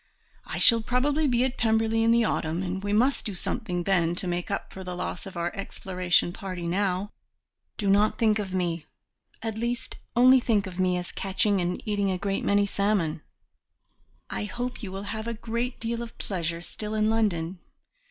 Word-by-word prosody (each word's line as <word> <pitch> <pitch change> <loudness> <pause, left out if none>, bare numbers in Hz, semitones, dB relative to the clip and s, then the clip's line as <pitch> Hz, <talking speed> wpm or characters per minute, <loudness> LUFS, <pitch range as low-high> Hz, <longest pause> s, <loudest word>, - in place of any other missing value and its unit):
I - - -4
shall 230 -2 +6
probably 280 +6 +1
be 245 -1 +3
at 260 0 -2
Pemberley 225 0 +2
in 225 - +3
the 235 0 +5
autumn, 165 -4 0
and 190 +1 -3
we 205 - -1
must 245 +7 +3
do 205 -4 -4
something 180 -1 -2
then 175 -3 +2
to 185 - -1
make 175 0 -2
up 200 - -3
for 190 - -7
the 180 -1 -5
loss 180 +2 -4
of 190 - -9
our 170 0 -2
exploration 180 -3 0
party 185 -3 -5
now. 190 +2 0 0.7
Do 205 - -2
not 205 +2 +4
think 220 -2 +3
of 195 -2 -3
me 175 -3 -1 0.6
at 220 -1 -3
least, 235 +1 -3 0.2
only 255 +2 +7
think 220 -4 +1
of 185 -1 -7
me 180 -1 +2
as 180 0 -5
catching 195 0 +1
and 175 +1 -2
eating 205 -2 +1
a 185 - 0
great 195 +1 -1
many 205 0 +3
salmon. 200 -6 0 1.1
I - - -3
hope 245 +4 -4
you 200 -5 -5
will 195 +1 -5
have 220 +2 -4
great 235 +2 -2
deal 230 +1 -2
of 235 -1 -8
pleasure 170 -3 -3
still 215 +3 -5
in 215 0 +2
London. 185 -6 0
200 Hz, 190 wpm, -27 LUFS, 180-225 Hz, 1.1 s, only